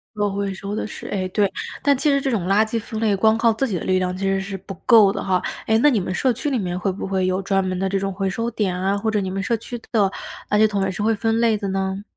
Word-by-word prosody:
可 205 Hz, -1 st, 0 dB
回 200 Hz, -1 st, -2 dB
收 200 Hz, +2 st, -5 dB
的 -, -, -2 dB
是 -, -, -8 dB
哎， 190 Hz, -2 st, -2 dB
对， 200 Hz, +1 st, +1 dB, 0.3 s
但 285 Hz, -2 st, +4 dB
其 300 Hz, -, 0 dB
实 280 Hz, -1 st, +3 dB
这 270 Hz, -, -1 dB
种 195 Hz, -7 st, -1 dB
垃 205 Hz, +3 st, +4 dB
圾 230 Hz, +1 st, -2 dB
分 220 Hz, 0 st, -6 dB
类， 210 Hz, -3 st, +2 dB
光 220 Hz, +3 st, +3 dB
靠 230 Hz, 0 st, +3 dB
自 270 Hz, +5 st, -1 dB
己 195 Hz, -6 st, -2 dB
的 -, -, -4 dB
力 185 Hz, 0 st, +2 dB
量 180 Hz, 0 st, -1 dB
其 190 Hz, -, -7 dB
实 195 Hz, 0 st, +1 dB
是 195 Hz, 0 st, -5 dB
不 195 Hz, +1 st, -9 dB
够 220 Hz, -5 st, +7 dB
的 -, -, -4 dB
哈。 185 Hz, -2 st, +1 dB, 0.2 s
哎， 220 Hz, -, +3 dB
那 295 Hz, +5 st, +5 dB
你 230 Hz, -, +2 dB
们 185 Hz, 0 st, -3 dB
社 255 Hz, +3 st, +2 dB
区 265 Hz, +6 st, -3 dB
里 260 Hz, -, +1 dB
面， 180 Hz, -2 st, -2 dB
会 190 Hz, +1 st, -1 dB
不 190 Hz, -, -6 dB
会 190 Hz, -1 st, 0 dB
有 185 Hz, +1 st, 0 dB
专 195 Hz, 0 st, +1 dB
门 185 Hz, 0 st, -2 dB
的 190 Hz, +1 st, -1 dB
这 195 Hz, 0 st, 0 dB
种 195 Hz, 0 st, -2 dB
回 195 Hz, 0 st, -2 dB
收 230 Hz, +5 st, -2 dB
点 190 Hz, -5 st, -1 dB
啊？ 195 Hz, +2 st, +1 dB
或 220 Hz, +2 st, -1 dB
者 210 Hz, -2 st, +1 dB
你 190 Hz, -, -3 dB
们 195 Hz, +1 st, -3 dB
社 230 Hz, +2 st, 0 dB
区 240 Hz, +2 st, -7 dB
的 205 Hz, -4 st, +3 dB, 0.4 s
垃 210 Hz, -, +3 dB
圾 215 Hz, 0 st, +5 dB
桶 200 Hz, -2 st, -1 dB
也 195 Hz, -, 0 dB
是 195 Hz, +3 st, -4 dB
会 225 Hz, +1 st, +3 dB
分 225 Hz, +1 st, 0 dB
类 225 Hz, -3 st, +3 dB
的 200 Hz, -, -4 dB
呢？ 190 Hz, +1 st, -2 dB
200 Hz, 335 characters per minute, -22 LUFS, 190-225 Hz, 0.4 s, 够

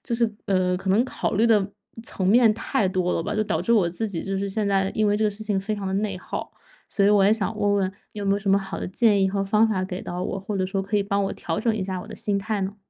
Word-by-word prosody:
就 235 Hz, -, -2 dB
是， 230 Hz, -1 st, +1 dB, 0.2 s
呃， 185 Hz, -2 st, +1 dB
可 190 Hz, +1 st, -2 dB
能 205 Hz, +5 st, +4 dB
考 260 Hz, -, -2 dB
虑 220 Hz, +3 st, +3 dB
的 215 Hz, -4 st, +4 dB, 0.4 s
层 190 Hz, -4 st, -2 dB
面 230 Hz, 0 st, +6 dB
太 230 Hz, 0 st, 0 dB
多 185 Hz, -1 st, 0 dB
了 -, -, -1 dB
吧， 205 Hz, +4 st, -3 dB
就 215 Hz, -, +1 dB
导 -, -, -1 dB
致 235 Hz, -, +1 dB
我 200 Hz, -7 st, +4 dB
自 180 Hz, +6 st, -3 dB
己 175 Hz, -5 st, -4 dB
就 195 Hz, 0 st, -3 dB
是 200 Hz, +1 st, -2 dB
现 205 Hz, +2 st, -1 dB
在 195 Hz, -1 st, +1 dB
因 215 Hz, -1 st, +2 dB
为 205 Hz, -, +2 dB
这 215 Hz, -, +1 dB
个 210 Hz, -, +2 dB
事 205 Hz, +2 st, -7 dB
情 205 Hz, -2 st, 0 dB
非 205 Hz, +3 st, -2 dB
常 200 Hz, -1 st, -5 dB
得 190 Hz, -, -2 dB
内 200 Hz, -1 st, -1 dB
耗。 -, -, -6 dB, 0.4 s
所 200 Hz, -, +1 dB
以 -, -, +5 dB
我 205 Hz, -1 st, +5 dB
也 200 Hz, -, +5 dB
想 215 Hz, -3 st, -2 dB
问 205 Hz, 0 st, +2 dB
问 190 Hz, -2 st, +1 dB, 0.2 s
你 -, -, -9 dB
有 205 Hz, -, -3 dB
没 195 Hz, -, +3 dB
有 200 Hz, -, +1 dB
什 200 Hz, -1 st, -1 dB
么 195 Hz, -, +5 dB
好 195 Hz, -1 st, -6 dB
的 -, -, -4 dB
建 205 Hz, +1 st, +3 dB
议 -, -, +4 dB
和 195 Hz, +1 st, -1 dB
方 210 Hz, +3 st, +3 dB
法 205 Hz, -4 st, -1 dB
给 185 Hz, -1 st, -5 dB
到 175 Hz, +1 st, -4 dB
我， 195 Hz, -, -3 dB
或 200 Hz, +1 st, -4 dB
者 185 Hz, -, 0 dB
说 195 Hz, +1 st, -2 dB
可 195 Hz, +2 st, -5 dB
以 205 Hz, -, +3 dB
帮 200 Hz, 0 st, 0 dB
我 -, -, -2 dB
调 165 Hz, -, -3 dB
整 225 Hz, 0 st, +1 dB
一 215 Hz, -, -2 dB
下 190 Hz, -1 st, -3 dB
我 -, -, -12 dB
的 -, -, -8 dB
心 205 Hz, -3 st, -1 dB
态 205 Hz, +1 st, -2 dB
呢？ 195 Hz, +1 st, -3 dB
200 Hz, 345 characters per minute, -24 LUFS, 190-215 Hz, 0.4 s, 面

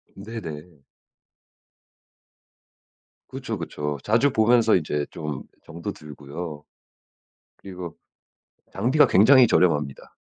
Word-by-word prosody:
네네. 90 Hz, -7 st, -9 dB, 2.5 s
그쵸, -, -, -5 dB
그쵸. 75 Hz, 0 st, -4 dB
자주 120 Hz, +7 st, +2 dB
보면서 115 Hz, 0 st, +4 dB
이제 75 Hz, -4 st, -1 dB
좀 75 Hz, -4 st, -6 dB, 0.2 s
정도 85 Hz, +5 st, -6 dB
들고요. 75 Hz, +1 st, -9 dB, 1.0 s
그리고 90 Hz, -4 st, -8 dB, 0.8 s
장비가 125 Hz, +9 st, +3 dB
굉장히 125 Hz, +7 st, +6 dB
저렴합니다. 75 Hz, -9 st, 0 dB
90 Hz, 195 characters per minute, -24 LUFS, 75-110 Hz, 2.5 s, 굉장히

